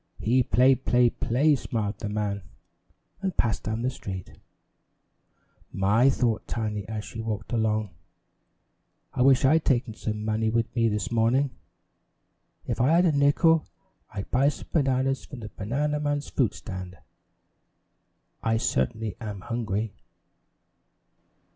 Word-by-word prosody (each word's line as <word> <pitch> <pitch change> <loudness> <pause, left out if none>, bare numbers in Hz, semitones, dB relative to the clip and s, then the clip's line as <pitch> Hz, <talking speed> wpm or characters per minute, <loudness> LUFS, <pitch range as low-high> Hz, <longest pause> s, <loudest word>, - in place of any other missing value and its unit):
"He 125 +4 +2
play, 125 +2 +4
play, 125 -2 +3
play," 145 +6 +2
smiled 105 -5 -3
the 105 - -4
man, 105 -1 -2 0.8
and 190 -3 -2
passed 110 -3 +1
down 110 +2 -3
the 130 - +1
street. 95 -7 -7 1.4
"My," 105 +7 +3
thought 120 -4 0
Tiny, 105 -3 -3
as 110 0 -4
she 115 - -7
walked 110 0 -4
along, 110 -3 0 1.2
"I - - -1
wish 135 0 +5
I 135 - +5
had 160 0 +2
taken 125 -3 +1
some 105 -1 -4
money 110 0 +1
with 115 0 -1
me 115 -1 +3
this 105 +2 -2
morning. 120 +4 +2 1.1
If - - -2
I 135 +6 +4
had 175 +2 +5
a 170 - +4
nickel, 150 +3 +3 0.4
I'd 100 -2 -6
buy 135 +3 +4
some - - -8
bananas 135 -3 +1
from 130 - -9
that 110 - -9
banana 145 +8 -1
man's 145 -1 -2
fruit 120 -7 +1
stand. 95 -2 -7 1.4
I 115 0 +1
certainly 105 - -1
am 105 -4 -5
hungry." 110 -2 -2
115 Hz, 135 wpm, -26 LUFS, 105-135 Hz, 1.4 s, wish